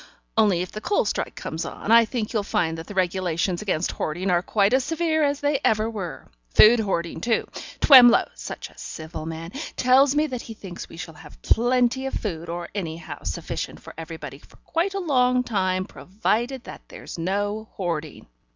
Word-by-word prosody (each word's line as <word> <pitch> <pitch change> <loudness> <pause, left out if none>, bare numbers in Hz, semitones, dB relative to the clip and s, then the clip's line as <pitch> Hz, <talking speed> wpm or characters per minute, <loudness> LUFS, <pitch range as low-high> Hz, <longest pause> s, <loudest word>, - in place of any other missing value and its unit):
Only 200 -5 +3
if 180 - -8
the 215 - -7
coal 410 - +1
strike - - -2
comes 160 +1 -4
on, 215 - -4
I 230 0 +8
think 220 -1 -3
you'll 215 - +1
find 170 -5 0
that 160 - -9
the 205 - -8
regulations 180 -1 0
against 185 -5 -1
hoarding 180 +5 -2
are 175 -1 +3
quite 200 +3 +2
as 260 0 +3
severe 325 +1 0
as 285 -1 +1
they 290 -1 +1
ever 215 0 +2
were. 200 -7 -6 0.3
Food 230 +2 +8
hoarding, 170 -6 -2
too. 230 +2 0 0.3
Twemlow 245 -4 +8
such - - -7
a - - -23
civil 160 0 -7
man 165 +1 -6 0.2
tells 265 +2 +4
me 300 +1 +3
that 255 -5 -4
he 225 - -9
thinks 185 -4 -9
we - - -12
shall 170 -1 -7
have - - -14
plenty 245 +2 +2
of - - -4
food, 170 -5 -4
or 170 0 -5
anyhow 165 -5 -5
sufficient - - -4
for - - -12
everybody 160 -3 -8
for - - -21
quite 355 +5 -1
a - - 0
long 250 -7 +2
time, 185 -5 0
provided 230 +7 -2
that - - -10
there's - - -9
no 205 +5 -2
hoarding. 165 -5 -4
205 Hz, 190 wpm, -24 LUFS, 175-250 Hz, 0.3 s, I